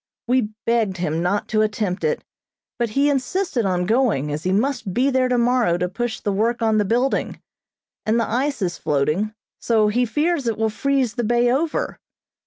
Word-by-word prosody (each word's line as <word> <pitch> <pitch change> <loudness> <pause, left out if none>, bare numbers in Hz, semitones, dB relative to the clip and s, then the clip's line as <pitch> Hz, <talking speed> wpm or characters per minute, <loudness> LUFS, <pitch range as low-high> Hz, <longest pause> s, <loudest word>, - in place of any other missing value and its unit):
We 245 -3 +2 0.2
begged 225 -5 +1
him 165 -2 -1
not 180 +4 0
to 215 0 +2
attempt 210 -3 -1
it, 470 +1 0 0.6
but 235 -1 0
he 275 +7 +2
insisted 275 - 0
on 180 -1 0
going, 215 - +1
as 150 +3 -4
he 185 - +1
must 225 -2 -1
be 265 +3 +2
there 260 -1 +2
tomorrow 240 -7 +2
to 180 +1 -1
push 240 +4 -3
the 205 - -2
work 225 +4 0
on 220 -2 +2
the 205 - +2
building, 245 +6 0 0.7
and 225 +2 +3
the 230 - 0
ice 250 -1 -1
is 175 -2 -2
floating, 155 +9 0 0.2
so 220 -2 +2
he 245 +4 +1
fears 295 +2 0
it 225 - 0
will 220 0 0
freeze 270 0 0
the 240 -1 -2
bay 240 +2 +2
over. 305 +5 -1
230 Hz, 190 wpm, -22 LUFS, 200-255 Hz, 0.7 s, and